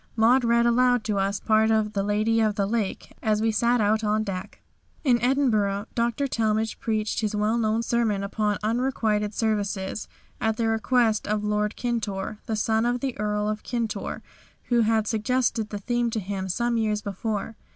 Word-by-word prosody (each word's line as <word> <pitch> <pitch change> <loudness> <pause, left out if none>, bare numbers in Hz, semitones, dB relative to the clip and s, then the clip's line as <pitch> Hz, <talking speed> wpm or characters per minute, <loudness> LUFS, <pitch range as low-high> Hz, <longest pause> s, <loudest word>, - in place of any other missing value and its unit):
Maud 240 +3 +4
read 235 0 +3
aloud 245 0 +3
to 210 -2 -1
us 195 +1 0
parts 220 0 +3
of 215 -1 +1
'The 200 - 0
Lady 215 +3 +1
of 215 -2 +1
the 200 - +1
Lake' 210 -1 -3
as 215 -1 +1
we 225 +1 +2
sat 235 +3 +2
out 215 +1 +2
on 215 +1 +1
deck." 190 -3 -6 0.4
In 245 -5 +3
Edinburgh 220 -6 +1
Dr. 235 +4 0
Talmage 220 -3 0
preached 215 -1 -1
his 215 -1 -1
well 210 +2 +1
known 225 0 +1
sermon 225 -4 0
upon 210 0 -1
unrequited 220 -3 0
services, 205 -3 -1 0.3
at 220 0 0
the 230 - +1
request 225 0 +1
of 210 0 0
Lord 210 0 0
Kintore, 215 -4 -3
the 220 - -1
son 220 +2 +1
of 245 +1 0
the 265 -3 -2
Earl 210 0 0
of 215 0 -2
Kintore, 235 -3 -3 0.5
who 240 -1 +3
had 220 -1 +2
suggested 225 0 0
the 205 - -4
theme 240 +3 0
to 225 - -2
him 190 -1 -4
some 235 +5 0
years 215 -2 0
before. 210 +2 -3
220 Hz, 180 wpm, -25 LUFS, 210-235 Hz, 0.5 s, Maud